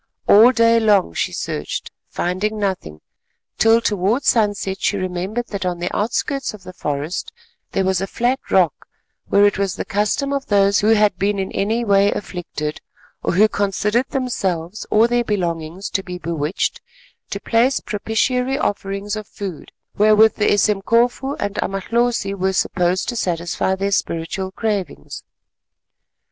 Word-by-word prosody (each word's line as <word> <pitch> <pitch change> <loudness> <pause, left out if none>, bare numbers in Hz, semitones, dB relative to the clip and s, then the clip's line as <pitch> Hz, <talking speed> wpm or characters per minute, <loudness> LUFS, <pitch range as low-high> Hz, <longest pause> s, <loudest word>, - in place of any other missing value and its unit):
All 225 +5 +8
day 230 -2 +4
long 205 - +3
she - - -1
searched, 75 - -4 0.2
finding 195 +5 -2
nothing, 185 - -3 0.6
till 225 +1 +5
towards 210 +5 +1
sunset 205 -4 0
she 200 - +1
remembered 185 +5 -3
that 200 -2 -4
on 180 -1 -1
the 175 +1 -3
outskirts 245 +4 -1
of 200 - -15
the 185 0 -10
forest 150 +1 -3 0.4
there 190 - +1
was 190 -1 +1
a 195 - -2
flat 245 +6 0
rock 180 -6 +2 0.4
where 200 0 +4
it 205 -1 +2
was 195 -3 0
the - - -4
custom 215 +8 0
of 275 -1 -3
those 200 -1 +3
who 210 - +1
had 210 -4 +3
been 200 +1 +1
in 190 -1 -3
any 225 +4 0
way 200 -1 +4
afflicted, 165 -6 -5 0.4
or - - -1
who 205 +5 +5
considered 210 +5 0
themselves 195 - -2
or 220 +2 +4
their 240 0 +1
belongings 175 -3 -3
to 195 - 0
be 180 -1 -7
bewitched, 165 0 -2 0.5
to - - -4
place 245 +4 +2
propitiatory 250 +5 -1
offerings 200 -4 -2
of 215 -1 -6
food 190 -6 -7 0.3
wherewith 215 +1 +5
the 210 - +2
Esemkofu 230 +7 +2
and 205 0 -3
Amalhosi 215 +1 0
were 190 0 -1
supposed 180 0 0
to 240 - -3
satisfy 175 -1 -1
their 195 +1 -2
spiritual 190 +1 -2
cravings. 200 - -3
200 Hz, 150 wpm, -20 LUFS, 185-220 Hz, 0.6 s, All